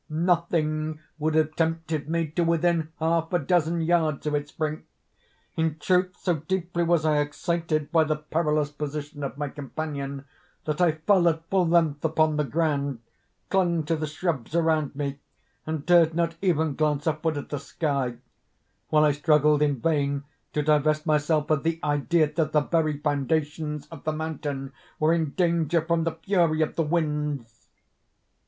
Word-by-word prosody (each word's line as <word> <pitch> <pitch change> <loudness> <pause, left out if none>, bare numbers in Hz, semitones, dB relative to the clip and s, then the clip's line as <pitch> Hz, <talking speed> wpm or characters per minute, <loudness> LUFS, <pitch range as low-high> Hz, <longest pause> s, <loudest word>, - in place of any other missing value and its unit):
Nothing 155 -2 0 0.2
would 155 +1 0
have 155 -1 +2
tempted 165 -2 -1
me 165 0 +1
to 165 +3 0
within 165 -1 +1
half 165 0 0
a 175 - +3
dozen 170 +1 +1
yards 160 -3 +1
of 150 - -1
its 145 0 -2
brink. 155 -1 -3 0.7
In 160 -1 0
truth 180 +3 +1
so 175 -3 0
deeply 175 +2 -2
was 170 -2 +2
I 150 -1 +3
excited 155 +1 -1
by 160 -1 +4
the 155 0 0
perilous 150 -1 0
position 150 0 -5
of 140 0 -4
my 145 0 -2
companion, 140 -1 -5 0.4
that 150 +2 -1
I 170 -3 +4
fell 175 +2 +3
at 165 0 -4
full 185 -3 +3
length 165 -4 +2
upon 155 -1 +2
the 150 - +2
ground, 140 -4 -1 0.5
clung 175 -4 +2
to 165 +2 0
the 155 -1 -3
shrubs 155 -3 -3
around 160 -4 +1
me, 140 -1 -3 0.5
and 155 -2 -3
dared 170 -2 +5
not 165 -1 0
even 160 -5 +1
glance 150 -1 0
upward 155 0 0
at 145 - -6
the 145 - -3
sky—while 140 +1 -3
I 150 - +4
struggled 150 0 +3
in 145 -3 +2
vain 140 -2 0 0.3
to 150 - 0
divest 155 0 +2
myself 150 -1 +1
of 155 -2 +3
the 165 +1 -1
idea 150 +1 +1
that 155 -1 0
the 150 - +4
very 155 -1 0
foundations 150 +1 -1
of 165 - -11
the 155 - 0
mountain 145 -3 -4 0.2
were 155 +2 +3
in 160 -4 0
danger 170 -2 +2
from 165 +1 0
the 165 - 0
fury 170 -5 +3
of 155 - -4
the - - +1
winds. 150 -7 -2
155 Hz, 165 wpm, -26 LUFS, 150-165 Hz, 0.7 s, dared